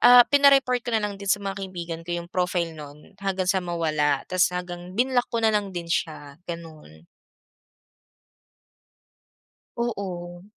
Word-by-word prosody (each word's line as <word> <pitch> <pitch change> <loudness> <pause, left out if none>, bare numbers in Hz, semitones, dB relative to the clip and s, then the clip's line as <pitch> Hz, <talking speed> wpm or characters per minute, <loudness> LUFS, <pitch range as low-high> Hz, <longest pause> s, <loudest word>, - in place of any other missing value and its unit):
ah, 245 0 +9
pina-report 275 -3 +5
ko 235 -1 -1
nalang 205 -2 -2
din 200 - -5
sa 200 0 +2
mga 195 0 -3
kaibigan 175 -3 -5
ko 175 0 -1
yung 170 0 -6
profile 180 -2 0
nun 150 +3 -12
hanggang 190 -2 -1
sa 190 -1 +2
mawala 155 -5 0
tapos 185 -1 +2
hanggang 180 +1 -6
binlock 250 0 +2
ko - - -3
nalang 210 -2 +2
din 175 -3 -6
siya, 155 -3 -3
gano'n. 155 - -9 2.7
Oo. 180 -7 -4
180 Hz, 135 wpm, -25 LUFS, 170-205 Hz, 2.7 s, ah